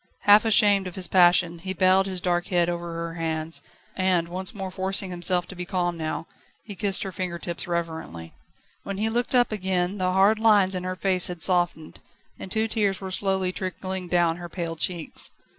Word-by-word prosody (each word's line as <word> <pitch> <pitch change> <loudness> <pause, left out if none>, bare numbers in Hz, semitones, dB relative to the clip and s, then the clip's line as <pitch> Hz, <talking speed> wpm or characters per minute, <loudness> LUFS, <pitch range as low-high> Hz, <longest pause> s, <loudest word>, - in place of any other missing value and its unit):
Half 205 +2 +6
ashamed 205 -3 +4
of 180 - -8
his 185 -2 0
passion, 175 -1 +4
he 190 +2 -5
bowed 190 +1 +3
his 185 -1 -1
dark 175 -1 -1
head 175 -2 +1
over 175 0 -4
her 165 0 -5
hands, 160 0 -1 0.3
and, 185 -3 +1
once 185 +1 -3
more 195 -3 -6
forcing 190 0 -2
himself 180 0 0
to 195 - -9
be 180 - -4
calm 175 -2 -1
now, 160 0 -4 0.4
he 210 - -8
kissed 195 0 0
her 195 - -5
finger 180 -1 -4
tips 170 0 -5
reverently. 160 - -5 0.5
When 195 -1 -6
he 220 +2 0
looked 240 +3 0
up 245 -2 +4
again 190 -1 -1
the 185 0 +1
hard 195 +4 +4
lines 205 -4 +4
in 180 -1 -3
her 185 0 -3
face 185 -1 +3
had 175 -2 -5
softened, 175 -4 0 0.4
and 190 - -8
two 220 +1 0
tears 205 -4 0
were 190 -1 -6
slowly 190 -1 0
trickling 185 -1 -5
down 175 -1 +2
her 175 -1 -8
pale 170 -1 -4
cheeks. 170 0 -3
185 Hz, 195 wpm, -25 LUFS, 175-195 Hz, 0.5 s, Half